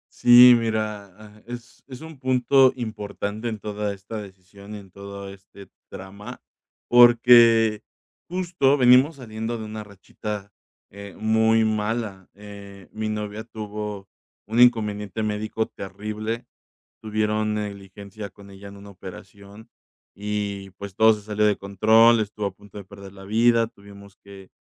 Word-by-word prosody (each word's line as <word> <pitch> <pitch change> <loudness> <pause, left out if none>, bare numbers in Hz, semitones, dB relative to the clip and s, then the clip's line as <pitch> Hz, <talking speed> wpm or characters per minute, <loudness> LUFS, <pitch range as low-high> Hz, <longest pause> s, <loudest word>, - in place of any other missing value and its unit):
Sí, 125 +1 +8
mira, 110 -3 -2
ah, 105 0 -16
es 120 -1 -10
es 130 0 -11
un 160 -3 -11
punto 130 0 +3
importante 110 -1 -5
en 110 - -5
toda 105 0 -4
esta 105 +3 -8
decisión 100 +1 -13
y - - -7
en 95 -2 -14
todo 100 +1 -9
este 100 0 -16 0.2
trama, 100 +2 -10 0.5
porque, 120 -2 +6 0.5
justo 170 -6 +1
venimos 130 +4 +5
saliendo 115 -2 -6
de 110 - -7
una 110 0 -7
rachita, 100 0 -8 0.4
eh, 100 -2 -11
muy 110 +1 +2
mala, 110 -2 -3
eh, 100 -2 -13
mi 110 0 -4
novia 105 0 -5
tuvo 105 -3 -7 0.4
un 110 +3 -1
inconveniente 105 -3 +2
médico 110 +1 -2
terrible, 105 +4 -6 0.6
tuvieron 110 0 -1
negligencia 100 0 -7
con 100 +1 -16
ella 100 +1 -12
en 100 0 -12
una 100 0 -13
operación, 100 +3 -13 0.5
y, 100 -1 -4
pues, 100 -1 -9
todo 110 +1 +5
se 105 - -8
salió 105 0 -2
de 105 -1 +2
control, 110 +4 +4
estuvo 105 0 -4
a 100 - -3
punto 100 +1 -16
de 100 - -8
perder 100 -1 -13
la 95 -1 -13
vida, 115 +3 +3
tuvimos 100 -3 -16
que 100 -1 -14
105 Hz, 140 wpm, -23 LUFS, 100-115 Hz, 0.6 s, Sí